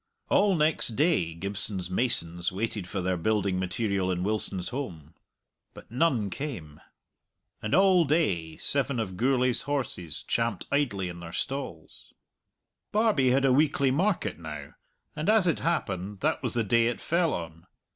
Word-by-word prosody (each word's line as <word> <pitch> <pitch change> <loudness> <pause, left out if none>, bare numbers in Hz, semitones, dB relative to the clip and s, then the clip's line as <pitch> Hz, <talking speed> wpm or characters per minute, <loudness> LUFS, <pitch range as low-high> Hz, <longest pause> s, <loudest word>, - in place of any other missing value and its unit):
All 200 -2 +4
next 155 -7 +2
day 140 - +2
Gibson's 95 0 0
masons 90 -6 0
waited 105 -1 -3
for 95 0 -3
their 90 0 0
building 100 0 0
material 95 0 -1
in 90 -1 -1
Wilson's 100 -3 -2
holm. 90 - -6 0.6
But - - -13
none 120 - +1
came. 90 - -6 0.8
And 110 +6 0
all 185 -2 +5
day 95 - 0
seven 140 -2 0
of 95 -5 -3
Gourlay's 125 +2 +2
horses 125 - -3
champed 115 -3 -1
idly 120 -10 0
in 85 -1 -7
their 85 -1 -8
stalls. 130 - -6 0.8
Barbie 210 - +3
had 135 +2 +3
a 130 - +4
weekly 140 -1 +3
market 180 - 0
now, 75 -3 -8 0.4
and, 155 +5 -1
as 215 -3 +5
it 170 - +1
happened, 100 - -2
that - - 0
was - - -2
the 120 - +2
day 115 +2 +3
it 120 - -2
fell 170 0 +1
on. 80 +1 -6
115 Hz, 150 wpm, -28 LUFS, 90-140 Hz, 0.8 s, all